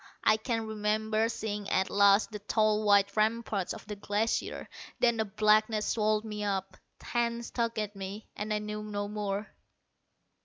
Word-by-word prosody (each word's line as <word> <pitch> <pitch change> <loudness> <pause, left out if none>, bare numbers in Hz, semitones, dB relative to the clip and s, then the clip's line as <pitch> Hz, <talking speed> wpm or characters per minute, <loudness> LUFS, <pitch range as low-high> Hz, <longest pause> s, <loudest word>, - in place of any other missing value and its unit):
I 215 - +5
can 225 0 -2
remember 215 +1 0
seeing 210 -3 -4
at 190 0 +1
last 200 +2 +5
the 210 - -5
tall 215 +1 +2
white 200 -1 +4
ramparts 215 -3 0
of - - -7
the 210 -1 -6
Glacier. 205 +2 -1 0.3
Then 235 -2 +3
a 220 - +2
blackness 215 +1 +3
swallowed 215 -1 +1
me 210 -1 -4
up, 195 -2 -2 0.2
hands 235 0 -2
tugged 230 -1 -1
at 210 -1 -2
me, 195 +2 -6
and 210 +1 -4
I 210 - +2
knew 210 0 -4
no 205 -1 -3
more.... 205 0 -3
215 Hz, 160 wpm, -30 LUFS, 205-220 Hz, 0.3 s, I